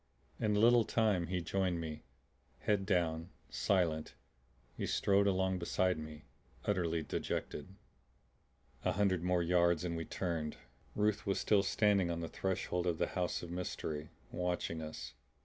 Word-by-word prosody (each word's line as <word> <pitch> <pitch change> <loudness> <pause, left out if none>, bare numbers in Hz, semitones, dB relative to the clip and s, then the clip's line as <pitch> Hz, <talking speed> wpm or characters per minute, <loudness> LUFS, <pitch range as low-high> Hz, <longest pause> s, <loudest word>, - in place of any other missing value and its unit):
In 105 -1 +2
a - - +3
little 120 +1 +6
time 105 -7 +2
he 90 +1 -1
joined 90 0 0
me; 80 -2 -5 0.6
head 100 -2 +1
down, 85 -4 +1 0.2
silent, 85 -5 +1 0.6
he - - -3
strode 100 0 +3
along 95 -1 +1
beside 90 0 +1
me, 75 -1 -8 0.4
utterly 85 -5 +1
dejected. 95 +4 -4 1.1
A - - +1
hundred 95 -3 +2
more 90 0 +2
yards 85 -1 +3
and 85 -1 -2
we 80 0 -3
turned. 85 -4 -3 0.4
Ruth 105 0 +1
was 100 - +1
still 105 -2 +4
standing 100 -2 +3
on 85 -1 -1
the 85 - -3
threshold 90 -1 -1
of 85 -2 +1
the - - 0
house 90 -1 -1
of 85 - -6
mystery, 80 -4 -4 0.2
watching 90 -2 -2
us. 80 0 -6
90 Hz, 150 wpm, -35 LUFS, 85-95 Hz, 1.1 s, little